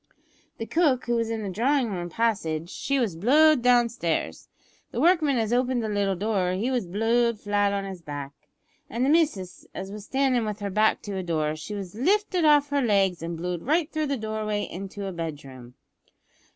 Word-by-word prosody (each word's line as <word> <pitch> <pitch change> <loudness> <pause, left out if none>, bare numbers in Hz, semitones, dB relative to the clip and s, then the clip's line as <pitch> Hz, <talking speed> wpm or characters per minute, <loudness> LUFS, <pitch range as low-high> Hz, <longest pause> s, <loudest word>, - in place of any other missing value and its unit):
The 225 - -4
cook, 270 0 +2
who 240 - 0
was 230 -1 0
in 225 -1 -3
the 200 - -3
drawin' 245 +4 +1
room 175 -2 -4
passage, 170 -6 -1
she 275 - -1
was 225 -10 0
blow'd 290 - +5
down 245 -1 +4
stairs; 170 - -3 0.4
the - - -4
workman 310 -3 +3
as 225 0 0
opened 250 -1 +1
the 220 - -2
little 200 -2 0
door, 190 -2 0
he 220 +8 -1
was 245 -8 -1
blow'd 225 +4 +1
flat 205 -1 +1
on 200 -1 -2
his 190 -3 -7
back; 145 -3 -6 0.6
an' 235 +2 -2
the 265 - +2
missis, 295 - 0
as 190 +1 -6
was 210 -1 -8
standin' 265 -2 +1
with 210 -1 -4
her 200 -1 -4
back 215 +2 +2
to 200 -2 -5
a - - -2
door, 155 -3 -1
she 155 +7 -7
was 195 -3 -6
lifted 365 - +1
off 295 -1 +5
her 285 0 +1
legs 195 -7 +2
and 165 0 -4
blow'd 175 0 -3
right 310 - +1
through 310 -1 -1
the 280 -1 -1
doorway 215 -1 -2
into 195 +2 -6
a 195 - -3
bedroom." 140 -7 -7
215 Hz, 200 wpm, -26 LUFS, 185-255 Hz, 0.6 s, blow'd